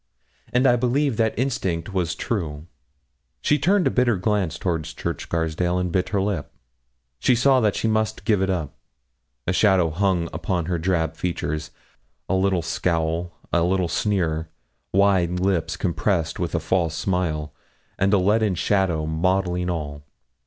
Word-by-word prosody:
And 125 +2 +2
I 125 -2 +5
believe 130 +1 +1
that 110 -1 +1
instinct 95 -8 -1
was 85 -3 0
true. 80 -9 -3 0.7
She 150 - +2
turned 185 +6 +3
a - - +3
bitter 120 -4 +2
glance 95 -2 0
toward 85 -4 -1
Church - - -4
Scarsdale, 85 +2 -1
and 90 -1 -1
bit 90 +1 0
her 100 - 0
lip. 95 -7 -2 0.7
She 125 - +3
saw 130 +2 +4
that 105 -4 +2
she - - 0
must 110 -1 0
give 105 -3 +2
it 95 - +1
up. 85 -6 -2 0.7
A 90 - 0
shadow 95 -5 +3
hung 90 0 +1
upon 85 +1 -1
her 85 0 -1
drab 80 -2 0
features. 80 -3 -3 0.6
A - - -1
little 95 -2 +2
scowl 85 +1 -1 0.2
a 85 - +4
little 90 +1 +1
sneer 85 -5 0 0.4
wide 95 -3 +3
lips 90 -2 0
compressed 85 -2 0
with 85 -1 -2
a - - +2
false 80 0 0
smile, 80 -6 -1 0.5
and 95 +1 +3
a 105 - +5
leaden 105 +1 +2
shadow 90 -4 +1
mottling 90 +2 0
all. 75 -4 -4
90 Hz, 155 wpm, -23 LUFS, 85-100 Hz, 0.7 s, I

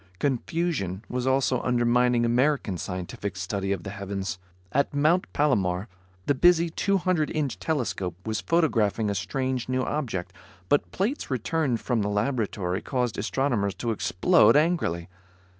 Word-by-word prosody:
Confusion 130 - -1
was 125 +1 -2
also 130 -2 +2
undermining 120 0 +2
American 125 -3 +1
scientific 95 +1 -5
study 95 +1 -2
of 95 -3 -2
the 100 - -6
heavens. 95 -3 -4 0.3
At 140 +1 +1
Mount 155 +6 +2
Palomar 100 -9 +1 0.4
the - - +3
busy 170 +3 +4
200 185 -4 +1
inch 140 - -2
telescope 110 - -2
was 110 -1 -2
photographing 115 - +1
a - - 0
strange 125 +7 -2
new 130 0 +1
object, 115 -14 -3 0.4
but 145 - +2
plates 220 +10 -2
returned 130 0 0
from 120 -4 0
the 100 - -1
laboratory 105 -4 -1
caused 125 -4 -1
astronomers 110 -3 0
to 120 - -2
explode 140 - +4
angrily. 150 - +1
125 Hz, 135 wpm, -26 LUFS, 100-145 Hz, 0.4 s, busy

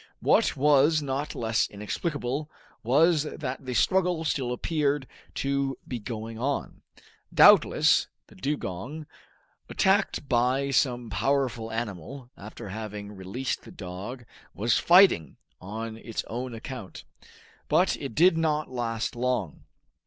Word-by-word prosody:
What - - +3
was 150 +2 +4
not 140 +2 -3
less 110 -1 0
inexplicable 135 - -3 0.3
was 150 +7 +4
that 140 -3 -5
the 125 - -2
struggle 180 +2 +2
still 135 -5 -1
appeared 145 +1 0 0.3
to 140 -1 -1
be 125 - -4
going 110 0 -6
on. 140 +3 -3 0.5
Doubtless, - - +6 0.2
the - - -19
dugong, 140 - -4 0.6
attacked 195 -6 +1
by 130 +3 +1
some 120 -3 +1
powerful 115 +2 0
animal, 120 - -6
after 100 0 -9
having 105 0 -6
released 100 +7 -4
the - - -14
dog, 100 +7 -8 0.3
was 115 +3 +1
fighting 175 - +5 0.2
on 110 +4 -6
its 115 -1 -5
own 125 +1 -5
account. 115 -3 -8 0.6
But - - +3
it 110 - -6
did 170 0 +5
not 155 -3 0
last 115 -3 -2
long. 120 - -2
125 Hz, 120 wpm, -27 LUFS, 110-145 Hz, 0.6 s, Doubtless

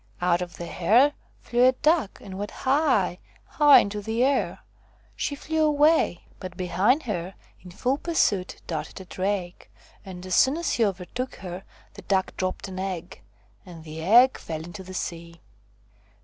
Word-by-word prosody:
Out 175 0 +2
of 175 -1 -6
the 170 - -6
hare 230 +13 +3 0.3
flew 240 +1 +1
a 260 - +4
duck 300 - +1
and 190 - -9
went 205 +1 -4 0.2
high, 260 - +2 0.3
high 295 -2 +6
into 205 +1 -4
the 225 +4 -1
air. 275 +1 0 0.5
She 285 - -2
flew 315 +2 -1
away, 300 - +3 0.2
but 185 -1 -8
behind 190 - +1
her 185 -5 -4 0.3
in 180 - -11
full 250 +10 -1
pursuit 205 - 0
darted 155 0 -5
a 190 - -10
drake, 185 -1 -4 0.3
and 185 -1 -9
as 185 - -4
soon 265 - +4
as 340 - -1
he 235 - +2
overtook 200 +7 -4
her 180 0 -8 0.3
the 200 - -11
duck 190 0 -1
dropped 185 +1 -3
an 185 -1 -7
egg, 185 - -5 0.4
and 165 -3 -12
the 160 0 -8
egg 240 +9 +5
fell 160 -1 -6
into 175 +3 -9
the 185 0 -10
sea. 170 -1 -6
190 Hz, 165 wpm, -25 LUFS, 180-255 Hz, 0.5 s, high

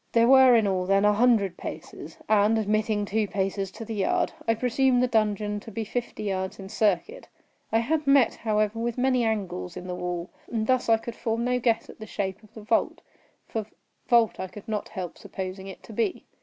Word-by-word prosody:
There 230 0 +5
were 260 -1 +7
in 225 -2 +4
all, 185 -2 0
then, 195 +1 +3
a 210 - +5
hundred 210 -5 +3
paces; - - -8
and, 215 +1 +4
admitting 215 0 0
two 215 +1 0
paces 195 0 -2
to 225 - -8
the 225 - -5
yard, 200 -3 0
I 225 - +3
presumed 250 +2 +2
the - - +3
dungeon 210 -2 0
to 215 - -11
be 225 +1 -4
fifty 235 0 -4
yards 190 -2 -2
in 195 -1 -9
circuit. 215 - 0 0.4
I 225 - +3
had 295 +6 0
met, 275 -4 +5
however, 215 0 0
with 235 +1 -2
many 255 -1 +2
angles 195 - -2
in 180 - -7
the 180 - -4
wall, 180 0 -4 0.2
and 225 -2 -1
thus 255 0 +1
I 225 - +6
could 230 +1 -7
form 225 0 -2
no 250 0 +1
guess 230 -2 +1
at - - -13
the 220 - -8
shape 195 -1 -3
of 215 - -21
the 220 - -9
vault, 225 +2 0 0.5
for 220 -2 -4 0.4
vault 235 -3 +3
I 190 - -3
could 205 +2 -12
not 215 -2 -3
help 180 -2 -6
supposing 190 0 -6
it 190 - -10
to 225 - -11
be. 230 - -1
215 Hz, 210 wpm, -26 LUFS, 195-235 Hz, 0.5 s, were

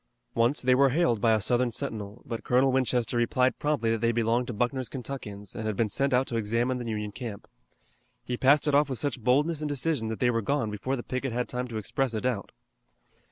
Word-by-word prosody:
Once 120 +6 +2
they 125 0 +4
were 135 +2 +5
hailed 130 -6 +1
by 115 - +4
a 110 - +3
Southern 120 +3 +1
sentinel, 105 -1 -5
but 115 -2 -5
Colonel 130 +2 +3
Winchester 125 -2 0
replied 125 +2 +2
promptly 145 -7 +1
that 115 -1 -1
they 115 0 +3
belonged 120 +1 +1
to - - -3
Buckner's 120 +2 -1
Kentuckians 110 -7 -7
and 110 - -4
had 110 - -1
been 110 +1 +1
sent 140 +6 0
out 130 +1 +3
to 115 - -2
examine 115 +4 0
the 120 -1 -4
Union 105 -1 -3
camp. 110 -3 -7 0.8
He 125 - -2
passed 140 +4 +4
it 145 - +2
off 145 0 +4
with 130 - -2
such 140 -2 -2
boldness 145 +6 +2
and 150 - -2
decision 145 -4 -1
that 110 0 -4
they 120 -1 +3
were 115 -1 0
gone 115 -1 0
before 115 +6 -2
the 120 - -5
picket 130 -1 -3
had 125 +1 -1
time 125 0 -3
to 115 -2 -5
express 120 +3 -1
a 110 - -2
doubt. 125 -6 -2
125 Hz, 230 wpm, -28 LUFS, 115-130 Hz, 0.8 s, were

